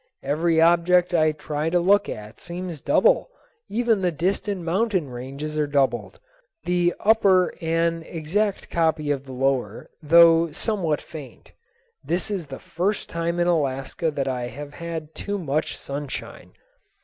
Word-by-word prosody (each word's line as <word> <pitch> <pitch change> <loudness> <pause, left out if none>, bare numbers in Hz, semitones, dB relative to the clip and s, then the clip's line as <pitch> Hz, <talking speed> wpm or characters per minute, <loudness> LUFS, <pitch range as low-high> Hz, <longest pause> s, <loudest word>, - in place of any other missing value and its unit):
Every 160 +4 +1
object 175 +2 +4
I 155 -2 +4
try 150 +1 -3
to 175 +1 +2
look 200 +3 +3
at 105 +1 -8
seems 175 -3 -6
double; - - +3 0.4
even 230 -2 +1
the 180 -1 +1
distant 190 +4 -1
mountain 185 - 0
ranges 140 +5 -5
are 150 - +1
doubled, 140 -2 0 0.4
the 175 -1 +1
upper 195 -4 +4
an 165 0 +1
exact 190 +6 -2
copy 160 -3 +1
of 140 -1 -2
the 135 - -10
lower, 130 -4 -1
though 165 +1 +6
somewhat 170 -5 -1
faint. 150 -5 -11 0.5
This 180 +5 -1
is 185 -6 -3
the 135 -1 -7
first 195 +5 -2
time 170 +1 -2
in 175 - +3
Alaska 145 -1 0
that 140 -3 -2
I 125 -2 -2
have 145 +4 -9
had 165 -2 -6
too 205 0 -4
much 155 -4 -2
sunshine. 140 0 -7
165 Hz, 145 wpm, -24 LUFS, 145-180 Hz, 0.5 s, though